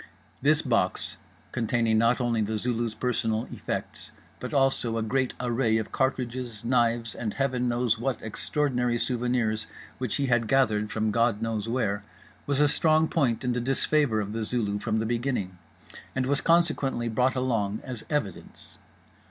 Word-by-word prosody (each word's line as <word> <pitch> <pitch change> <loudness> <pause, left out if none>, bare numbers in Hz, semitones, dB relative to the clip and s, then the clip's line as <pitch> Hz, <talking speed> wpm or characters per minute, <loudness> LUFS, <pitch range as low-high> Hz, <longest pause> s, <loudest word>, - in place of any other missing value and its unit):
This 150 +3 +3
box, 115 -8 0 0.3
containing 115 -2 +1
not 115 +3 +3
only 120 -3 +1
The 110 +1 -1
Zulu's 115 0 -1
personal 115 -2 -1
effects - - -5 0.3
but - - -5
also 135 -4 +2
a 110 - 0
great 130 +3 0
array 120 -2 +1
of 110 - -3
cartridges, 125 -4 -2
knives 120 -2 +1
and 110 -3 -4
heaven 130 -3 0
knows 120 -2 +1
what 125 0 -1
extraordinary 125 +1 0
souvenirs 120 -3 0 0.3
which 125 -4 -1
he 140 - 0
had 120 -3 +2
gathered 110 -6 +2
from 110 -1 0
God 115 -1 +2
knows 110 -1 -2
where, 105 -5 0 0.4
was 140 -1 +1
a 150 - +6
strong 155 +1 +3
point 120 -3 +1
in 125 -1 +1
the 120 - -1
disfavour 135 -1 +2
of 105 0 -3
The 115 - -2
Zulu 105 -2 -1
from 110 +1 -1
the 110 - 0
beginning; 115 -6 -2 0.6
and 130 -1 +1
was 140 +2 +1
consequently 155 -8 +2
brought 125 +4 +1
along 115 -5 0
as 125 -4 -6
evidence. 125 - -4
120 Hz, 160 wpm, -27 LUFS, 110-130 Hz, 0.6 s, a